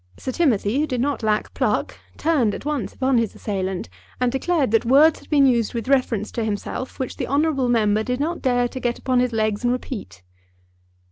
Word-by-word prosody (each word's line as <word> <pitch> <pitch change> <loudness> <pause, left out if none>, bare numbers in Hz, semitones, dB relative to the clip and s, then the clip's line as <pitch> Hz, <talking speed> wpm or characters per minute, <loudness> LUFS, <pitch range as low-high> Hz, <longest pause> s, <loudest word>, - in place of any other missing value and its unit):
Sir 260 - -4
Timothy, 255 -6 +1
who 305 - +1
did 250 -3 -2
not 280 +2 -1
lack 215 -1 0
pluck, - - -1 0.2
turned 280 -10 +1
at - - -9
once 295 -3 -2
upon 260 -2 +1
his 230 -3 -2
assailant, 190 -3 -3 0.3
and 250 -1 +1
declared 270 -1 0
that 225 - +3
words 285 +6 +5
had - - -19
been 285 -3 +5
used 240 -3 +2
with 230 +1 -3
reference 250 -6 +1
to 230 - -2
himself 220 +4 -4
which 260 - -4
the - - -3
honourable 280 -2 +1
member 215 -3 +2
did 250 +3 -2
not 330 +4 -2
dare 245 -2 +2
to 260 - -7
get 240 -1 -1
upon 255 -1 +1
his 250 0 +1
legs 215 -1 -1
and 245 - +2
repeat. 220 - -6
250 Hz, 205 wpm, -22 LUFS, 220-275 Hz, 0.3 s, words